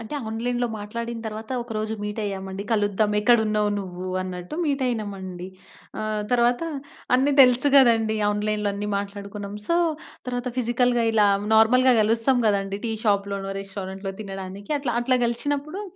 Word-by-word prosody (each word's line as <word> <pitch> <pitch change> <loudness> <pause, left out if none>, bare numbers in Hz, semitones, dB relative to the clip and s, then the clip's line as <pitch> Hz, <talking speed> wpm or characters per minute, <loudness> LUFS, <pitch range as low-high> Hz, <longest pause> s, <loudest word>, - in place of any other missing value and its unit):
అంటే 230 +6 -7
ఆన్‌లైన్‌లో 245 +2 -1
మాట్లాడిన 230 +2 -5
తరువాత 220 +1 -7
ఒక 235 - -16
రోజు 215 +1 -2
మీట్ 210 +1 -4
అయ్యామండి. 195 -1 -4
కలుద్దాం 210 0 +1
ఎక్కడున్నావు 215 -2 +3
నువ్వు 185 -1 -6 0.2
అన్నట్టు 180 +4 -6
మీట్ 280 -2 0
అయినమండి. 195 -6 -4 0.5
ఆహ్, 215 -1 -2
తరువాత 240 +1 +3 0.5
అన్ని 270 +3 +3
తెలుసు 250 +1 +6
కదండీ! 225 -4 +5
ఆన్‌లైన్‌లో 210 0 -1
అన్నీ 205 +1 -4
మాట్లాడుకున్నాం. 200 0 -6
సో 335 - +2 0.5
తరువాత 245 0 -2
ఫిజికల్‌గా 240 0 +2
ఇలా 215 -2 +4 0.3
నార్మల్‌గా 250 +4 +5
కలుస్తాం 230 +4 +2
కదండీ! 200 -1 0
టీ 225 - -1
షాప్ 200 -2 +2
లోనో 195 0 -3
రెస్టారెంట్‌లో 195 0 -6
తినడానికి 195 +2 -7
అట్లా 260 -4 -2
అట్లా 255 +1 +2
కలిసినప్పుడు 290 - -3
215 Hz, 140 wpm, -24 LUFS, 200-240 Hz, 0.5 s, తెలుసు